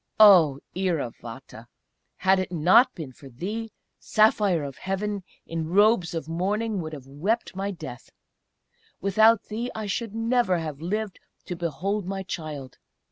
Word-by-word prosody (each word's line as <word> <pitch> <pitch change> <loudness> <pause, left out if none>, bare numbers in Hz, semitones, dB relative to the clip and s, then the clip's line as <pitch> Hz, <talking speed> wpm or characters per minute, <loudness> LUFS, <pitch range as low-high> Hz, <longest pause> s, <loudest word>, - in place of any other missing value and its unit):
Oh! 175 -10 +7 0.2
Iravata, 130 -9 -4 0.5
had 190 0 +3
it 185 - -2
pot 185 - +5
been 155 -7 -7
for 135 +2 -14
thee, 210 - -5 0.3
Saphire 210 -6 +3
of 135 - -10
Heaven, 200 +1 -2 0.2
in 165 -1 -3
robes 200 -2 +3
of 160 -2 -4
mourning, 200 +5 -1
would 155 -1 -6
have 140 -4 -8
wept 170 - -2
my 195 +1 -2
death; 155 -10 -8 0.9
without 215 +3 +4
thee 230 +3 -4
I 220 -1 -4
should 220 +2 -3
never 225 -4 +2
have 155 -3 -5
lived 205 +3 -3 0.3
to 180 - -4
behold 180 +4 -2
my 195 0 -3
child! 150 -7 -6
185 Hz, 140 wpm, -26 LUFS, 155-210 Hz, 0.9 s, Oh